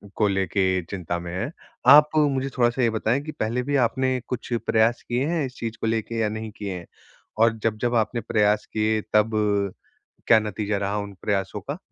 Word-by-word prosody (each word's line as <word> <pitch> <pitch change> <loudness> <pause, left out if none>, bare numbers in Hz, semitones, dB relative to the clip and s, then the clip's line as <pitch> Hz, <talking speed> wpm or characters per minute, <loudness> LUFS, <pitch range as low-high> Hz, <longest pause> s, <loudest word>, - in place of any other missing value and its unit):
को 105 - +2
लेके 95 -1 +1
चिंता 85 -3 -3
में 85 0 -7
हैं। 95 +10 -3 0.4
आप 150 +1 +8
मुझे 135 -3 +2
थोड़ा-सा 120 +1 +2
ये 115 - +4
बताएँ 110 +4 0
कि 155 - -6
पहले 125 -3 -2
भी 145 +2 -1
आपने 130 +1 0
कुछ 125 0 -5
प्रयास 115 +2 +2
किए 120 +3 -1
हैं 165 -4 0
इस 125 - -8
चीज़ 115 0 -5
को - - 0
लेके 115 +1 -1
या 110 - +1
नहीं 110 0 -5
किए 100 -2 -4
हैं 85 - -9 0.5
और 115 0 +3
जब-जब 115 +2 0
आपने 115 +1 0
प्रयास 105 -1 +1
किए 110 0 +1
तब 105 +1 +4 1.0
क्या 110 -1 +7
नतीजा 105 0 -2
रहा 100 +1 -1
उन 100 -1 -5
प्रयासों 100 0 -1
का? 145 - -5
110 Hz, 190 wpm, -24 LUFS, 105-125 Hz, 1.0 s, आप